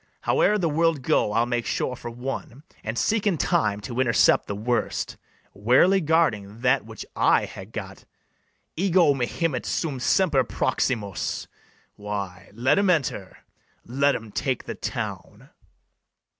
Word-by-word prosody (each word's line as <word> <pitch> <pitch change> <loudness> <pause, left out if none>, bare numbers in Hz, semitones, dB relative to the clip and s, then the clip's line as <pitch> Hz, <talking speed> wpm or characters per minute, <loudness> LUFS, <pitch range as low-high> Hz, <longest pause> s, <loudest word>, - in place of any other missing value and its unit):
Howe'er 210 - +3
the 180 -5 0
world 160 -2 +1
go, 105 - +2
I'll 115 +2 +3
make 120 -1 -2
sure 125 - -1
for 120 - -7
one, 125 +2 -6 0.2
And 110 +2 -4
seek 215 -1 +1
in 185 -5 +2
time 105 -6 +1
to 120 +5 -5
intercept 120 -3 +3
the 100 - -3
worst, 120 +4 -2 0.4
Warily 130 - +4
guarding 115 - +1
that 130 +2 +3
which 110 -1 -8
I - - +3
ha' - - -10
got: - - -8 0.7
Ego 175 -4 +4
mihimet 135 +2 -1
sum 145 -5 -2
semper 145 -1 +3
proximus: 105 -7 -2 0.5
Why, 100 -3 -5
let 130 - +3
'em 200 -1 +2
enter, 135 - -1 0.4
let 140 +4 +2
'em 110 -1 -7
take 130 +4 -2
the - - -5
town. - - -6
125 Hz, 140 wpm, -25 LUFS, 110-160 Hz, 0.7 s, Warily